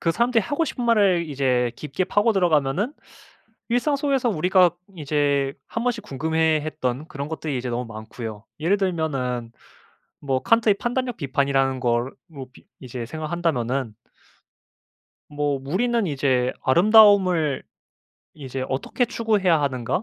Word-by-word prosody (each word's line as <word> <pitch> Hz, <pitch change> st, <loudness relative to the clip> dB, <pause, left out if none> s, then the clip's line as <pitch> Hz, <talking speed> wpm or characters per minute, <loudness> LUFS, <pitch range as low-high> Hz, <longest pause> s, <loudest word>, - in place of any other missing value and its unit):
그 165 Hz, -, +1 dB
사람들이 235 Hz, +2 st, +2 dB
하고 290 Hz, -, -1 dB
싶은 245 Hz, -5 st, -4 dB
말을 195 Hz, -8 st, +3 dB
이제 125 Hz, -4 st, 0 dB
깊게 150 Hz, +5 st, -3 dB
파고 205 Hz, +4 st, +2 dB
들어가면은 175 Hz, -, +1 dB, 0.8 s
일상 245 Hz, +5 st, +1 dB
속에서 275 Hz, -4 st, 0 dB
우리가 180 Hz, 0 st, +4 dB, 0.3 s
이제 145 Hz, -2 st, 0 dB, 0.2 s
한번씩 230 Hz, -2 st, -2 dB
궁금해했던 155 Hz, -2 st, -1 dB
그런 145 Hz, 0 st, -6 dB
것들이 155 Hz, -3 st, -4 dB
이제 125 Hz, 0 st, -4 dB
너무 120 Hz, 0 st, -3 dB
많고요. 110 Hz, 0 st, -8 dB, 0.2 s
예를 185 Hz, +6 st, +2 dB
들면은 135 Hz, -, -2 dB, 0.7 s
뭐 135 Hz, -2 st, -1 dB
칸트의 230 Hz, -3 st, +3 dB
판단력 245 Hz, +2 st, -2 dB
비판이라는 135 Hz, -1 st, 0 dB
걸로 120 Hz, +1 st, 0 dB, 0.4 s
비 -, -, -19 dB, 0.2 s
이제 125 Hz, -2 st, -6 dB
생각한다면은 140 Hz, -6 st, -2 dB, 1.4 s
뭐 145 Hz, -2 st, -1 dB
'우리는 225 Hz, -, 0 dB
이제 130 Hz, -3 st, +1 dB
아름다움을 185 Hz, -2 st, +5 dB, 0.7 s
이제 135 Hz, -3 st, -6 dB
어떻게 140 Hz, -, -1 dB
추구해야 210 Hz, -8 st, +1 dB
하는가?' 130 Hz, -, -1 dB
155 Hz, 310 characters per minute, -23 LUFS, 130-205 Hz, 1.4 s, 아름다움을